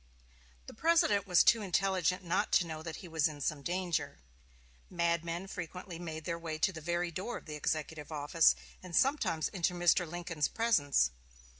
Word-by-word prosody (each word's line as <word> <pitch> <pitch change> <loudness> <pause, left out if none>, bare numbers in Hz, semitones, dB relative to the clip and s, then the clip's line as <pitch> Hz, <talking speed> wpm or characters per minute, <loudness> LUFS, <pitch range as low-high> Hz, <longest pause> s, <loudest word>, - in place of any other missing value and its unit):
The - - -10
President 310 - +3
was 180 -2 +5
too 230 - +5
intelligent 185 -1 +1
not 170 - 0
to 175 - +5
know 160 -1 -6
that 160 -1 -6
he - - -8
was 160 -1 +2
in 150 -2 -8
some 145 0 -2
danger. 175 +1 -2 0.7
Madmen 170 0 -1
frequently 180 -1 -7
made 160 -2 -6
their 170 -1 -3
way 160 -2 -4
to 185 +4 +1
the 160 - -8
very 175 +2 -1
door 190 +9 -4
of - - -13
the 155 - -7
executive 150 0 -3
office, 150 +2 +3 0.3
and 180 -2 -7
sometimes 265 - +2
into 180 -2 -1
Mr. 175 0 +3
Lincoln's 170 -3 -2
presence. 145 - +2
170 Hz, 170 wpm, -32 LUFS, 160-185 Hz, 0.7 s, was